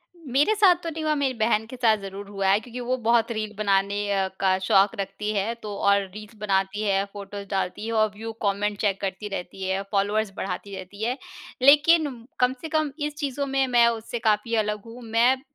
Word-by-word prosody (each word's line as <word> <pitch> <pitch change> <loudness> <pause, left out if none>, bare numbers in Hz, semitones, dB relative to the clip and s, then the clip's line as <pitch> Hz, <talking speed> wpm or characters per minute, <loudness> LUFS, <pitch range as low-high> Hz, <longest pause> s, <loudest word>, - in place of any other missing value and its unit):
उ, - - -21
मेरे 295 +11 +4
साथ 395 -4 +6
तो 330 - -2
नहीं 320 0 -5
हुआ, 310 0 +2
मेरी 280 -3 0
बहन 220 -1 +2
के 235 - -9
साथ 230 -4 +3
ज़रूर 195 +1 -7
हुआ 195 -1 -2
है 195 +2 +5
क्योंकि 245 +2 -9
वो 250 +1 -1
बहुत 235 0 +3
रील 215 -2 -3
बनाने 200 -1 +1
अ, 195 -1 +1
का 190 -1 +3
शौक 195 +1 +3
रखती 195 +2 -3
है। 205 +3 0
तो 210 -1 -5
और 200 0 +3
रील्स 215 +1 -10
बनाती 195 0 0
है, 195 -2 +2
फोटोस 200 0 -7
डालती 195 +1 -2
है 230 - -3
और 215 -1 +3
व्यू, 225 +2 -6
कमेंट 205 +1 0
चेक 200 -2 +1
करती 195 +1 -3
रहती 190 +2 -7
है, 190 +1 0
फ़ॉलोवर्स 205 +1 +1
बढ़ाती 195 +1 -4
रहती 190 +3 -8
है। 245 +3 0 0.4
लेकिन 290 -2 +5
कम 250 0 +3
से 320 - -6
कम 310 -2 0
इस 295 0 -2
चीज़ों 285 -2 -2
में 270 0 +1
मैं 240 -2 +5
उससे 230 +1 -2
काफ़ी 215 +2 +1
अलग 210 -1 -3
हूँ। 230 +2 -11
मैं 230 +3 +3
ज - - -19
215 Hz, 215 wpm, -25 LUFS, 200-250 Hz, 0.4 s, साथ